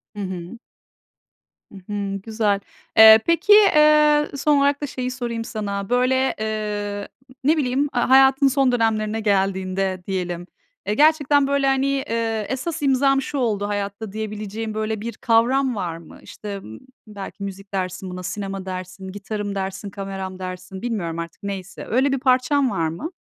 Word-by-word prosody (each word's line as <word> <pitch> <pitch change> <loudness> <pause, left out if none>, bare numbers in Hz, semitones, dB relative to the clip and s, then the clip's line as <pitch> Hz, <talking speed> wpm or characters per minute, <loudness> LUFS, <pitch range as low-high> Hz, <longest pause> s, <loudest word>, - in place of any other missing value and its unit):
Hı - - -7
hı. 185 +2 -6 1.1
Hı - - -13 0.2
hı, 200 -1 -2
güzel. 215 -2 0 0.4
Eee, 220 0 +10
peki, 335 +5 +4
eee, 300 -6 +5
son 290 +1 +2
olarak 280 +1 +2
da 290 - -2
şeyi 255 -1 -4
sorayım 240 -2 -4
sana: 200 -3 -4
Böyle, 255 +2 +2
eee, 210 -2 -3 0.4
ne 305 +4 +3
bileyim, 265 -2 0
eee, 245 - +2
hayatın 265 +2 +5
son 270 -1 +2
dönemlerine 220 -2 0
geldiğinde 190 -2 0
diyelim, 180 -2 -3 0.4
eee, 210 - +1
gerçekten 290 0 +4
böyle, 280 0 +1
hani, 270 0 +2
eee, 230 -5 -1
esas 295 +5 -3
imzam 275 0 +3
şu 285 - -5
oldu 210 -6 0
hayatta 205 +1 -4
diyebileceğin 215 +1 -5
böyle, 215 0 -2
bir 235 +1 -4
kavram 245 +3 +2
var 175 -5 -3
mı? 165 -1 -14
İşte, 205 -2 -7
ımm, 110 - -10 0.3
belki 200 -1 -8
müzik 195 0 -8
dersin 185 0 -3
buna, 180 0 -7
sinema 195 0 -5
dersin, 185 0 -7
gitarım 205 +1 -5
dersin, 195 +1 -4
kameram 195 -1 -6
dersin, 185 +1 -7
bilmiyorum 190 -9 -3
artık 170 +3 -8
neyse. 195 -2 -6
Öyle 265 +4 +2
bir 270 - 0
parçan 260 +1 +2
var 165 -5 0
mı? 170 - -5
215 Hz, 155 wpm, -22 LUFS, 195-265 Hz, 1.1 s, Eee